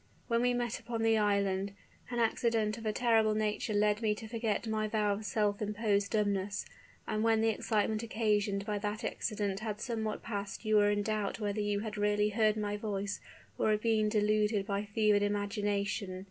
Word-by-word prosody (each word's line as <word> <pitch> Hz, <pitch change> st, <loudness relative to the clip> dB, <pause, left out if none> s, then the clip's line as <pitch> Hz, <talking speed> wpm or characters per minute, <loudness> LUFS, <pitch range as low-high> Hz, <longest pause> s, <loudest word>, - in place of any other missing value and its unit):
When 235 Hz, -1 st, +2 dB
we 245 Hz, 0 st, +2 dB
met 240 Hz, -2 st, -2 dB
upon 230 Hz, -2 st, -3 dB
the 225 Hz, -1 st, +4 dB
island, 200 Hz, -1 st, +1 dB, 0.4 s
an 240 Hz, -, -3 dB
accident 225 Hz, -2 st, +1 dB
of 225 Hz, -, -5 dB
a -, -, +2 dB
terrible 220 Hz, -2 st, +3 dB
nature 215 Hz, 0 st, -1 dB
led 210 Hz, +1 st, +2 dB
me 215 Hz, -2 st, +1 dB
to 220 Hz, +1 st, -8 dB
forget 225 Hz, -1 st, -1 dB
my 215 Hz, -1 st, -1 dB
vow 210 Hz, -1 st, +1 dB
of 210 Hz, +2 st, -5 dB
self 210 Hz, -1 st, 0 dB
imposed 210 Hz, -1 st, 0 dB
dumbness; 205 Hz, -2 st, 0 dB, 0.4 s
and 215 Hz, -, -1 dB
when 225 Hz, -1 st, +3 dB
the 225 Hz, -, +3 dB
excitement 215 Hz, 0 st, 0 dB
occasioned 210 Hz, -3 st, 0 dB
by 210 Hz, -1 st, -1 dB
that 210 Hz, +1 st, -3 dB
accident 205 Hz, -3 st, -2 dB
had 215 Hz, -1 st, -4 dB
somewhat 220 Hz, -3 st, -3 dB
passed 205 Hz, -1 st, -5 dB
you 215 Hz, 0 st, +4 dB
were 205 Hz, 0 st, +5 dB
in 205 Hz, 0 st, +1 dB
doubt 215 Hz, 0 st, -2 dB
whether 210 Hz, 0 st, -1 dB
you 205 Hz, -1 st, 0 dB
had 215 Hz, -1 st, -5 dB
really 210 Hz, 0 st, +2 dB
heard 215 Hz, 0 st, +2 dB
my 205 Hz, -1 st, -2 dB
voice 205 Hz, -1 st, -3 dB, 0.4 s
or -, -, +2 dB
had 210 Hz, 0 st, +2 dB
been 220 Hz, -2 st, +2 dB
deluded 210 Hz, -1 st, +2 dB
by 200 Hz, 0 st, -2 dB
fevered 210 Hz, 0 st, +2 dB
imagination. 205 Hz, -1 st, -1 dB
210 Hz, 190 wpm, -32 LUFS, 205-220 Hz, 0.4 s, were